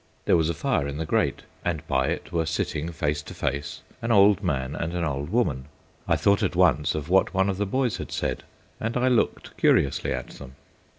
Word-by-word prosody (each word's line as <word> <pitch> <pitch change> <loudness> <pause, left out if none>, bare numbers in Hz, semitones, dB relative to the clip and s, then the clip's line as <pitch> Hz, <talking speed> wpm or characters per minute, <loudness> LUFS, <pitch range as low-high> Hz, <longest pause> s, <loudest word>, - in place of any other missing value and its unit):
There - - +4
was 80 -1 +2
a 85 - -1
fire 125 - 0
in 70 0 -5
the 80 - -2
grate, - - 0 0.2
and 80 -4 -2
by 65 0 +1
it 85 +3 -3
were 80 -2 0
sitting 80 0 -2
face 75 -2 -1
to - - -10
face 70 +1 -3 0.2
an 115 - -1
old 100 -1 +5
man 70 -6 -2
and 85 +2 -3
an 85 - -1
old 70 -1 -2
woman. 75 - 0 0.4
I - - +3
thought 100 +1 +3
at 95 -4 0
once 80 -5 +3
of 75 -1 -4
what 95 +2 +3
one 95 +1 +3
of 95 - -5
the 105 0 -1
boys 130 +2 0
had - - -7
said, - - -2 0.4
and 115 +2 -2
I 125 +1 +2
looked 120 -3 0
curiously 70 - +2
at - - -3
them. 70 -1 -11
85 Hz, 220 wpm, -25 LUFS, 75-100 Hz, 0.4 s, old